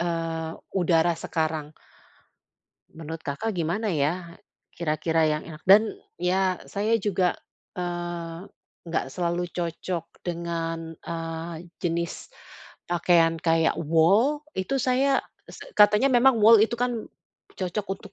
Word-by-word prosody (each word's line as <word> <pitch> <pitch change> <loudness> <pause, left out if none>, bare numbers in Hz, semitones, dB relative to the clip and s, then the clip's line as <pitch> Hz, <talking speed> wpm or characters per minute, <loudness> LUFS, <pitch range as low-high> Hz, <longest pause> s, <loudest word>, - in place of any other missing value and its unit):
eee, 165 -1 -2 0.2
udara 170 -1 +3
sekarang. 155 -2 -2 1.2
Menurut 160 0 -7
Kakak, 180 +11 -2
gimana 180 +6 -1
ya 170 +3 -1 0.3
kira-kira 160 0 0
yang 150 0 0
enak? 155 -1 -11
Dan 210 +3 +6 0.2
ya 185 0 +1
saya 210 +3 0
juga, 190 -3 +1 0.4
eee, 175 -1 -4 0.5
enggak 165 - -1
selalu 175 +2 -2
cocok 170 0 -3 0.2
dengan, 165 -1 -4
eee, 165 0 -5 0.2
jenis 170 -1 -2 0.6
pakaian 170 -1 +3
kayak 165 -1 +2
wol. 195 - +3
Itu 190 +9 -1
saya 265 +2 +2 0.3
se - - -11
katanya 210 +5 +6
memang 245 0 +5
wol 220 -1 +8
itu 225 +2 +1
kan 245 -2 -1 0.5
cocok 190 +2 -2
untuk, 200 0 -14
170 Hz, 115 wpm, -26 LUFS, 165-200 Hz, 1.2 s, wol